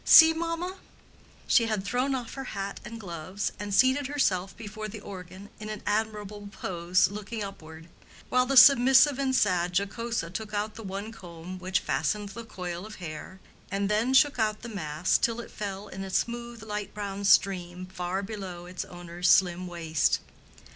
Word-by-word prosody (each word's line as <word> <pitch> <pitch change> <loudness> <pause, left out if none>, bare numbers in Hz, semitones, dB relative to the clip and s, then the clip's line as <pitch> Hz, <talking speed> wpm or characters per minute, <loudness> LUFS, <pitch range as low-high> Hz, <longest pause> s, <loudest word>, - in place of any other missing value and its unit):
See, 320 0 +9
mamma?" 335 +3 -3 0.7
She 230 -2 +4
had 215 -3 -1
thrown 250 +5 0
off 245 -3 -5
her 270 - -5
hat 195 0 -4
and 230 +1 -8
gloves, 185 +1 -4
and 205 0 -4
seated 260 +6 +4
herself 195 -10 0
before 215 -1 -6
the 215 +1 -7
organ 190 0 -9
in 215 0 -6
an 215 -1 -6
admirable 210 -1 -2
pose, 180 -1 +1
looking 210 +1 -5
upward; 160 -5 -9 0.4
while 250 0 +2
the 275 0 +2
submissive 265 +1 +8
and 265 -1 +1
sad 180 -5 +2
Jocosa 200 -2 -2
took 215 +1 -5
out 210 +1 -1
the 225 - -9
one 200 +2 -5
comb 180 -3 -9
which 185 0 0
fastened 200 +10 -1
the 230 +4 -8
coil 180 -5 -6
of 215 +1 -9
hair, 170 +2 -8 0.3
and 200 +1 -1
then 225 +5 +2
shook 285 -2 +5
out 215 -1 0
the 235 - -6
mass 175 -3 0
till 230 0 +1
it 235 - -8
fell 200 -1 -5
in 195 -1 -7
a 195 - -6
smooth 235 +3 -2
light 210 -2 -5
brown 200 -1 -4
stream 185 -2 +3
far 185 +1 -3
below 190 -4 -6
its 180 0 -5
owner's 175 0 -3
slim 180 -1 +4
waist. 165 -3 +1
200 Hz, 175 wpm, -28 LUFS, 185-230 Hz, 0.7 s, See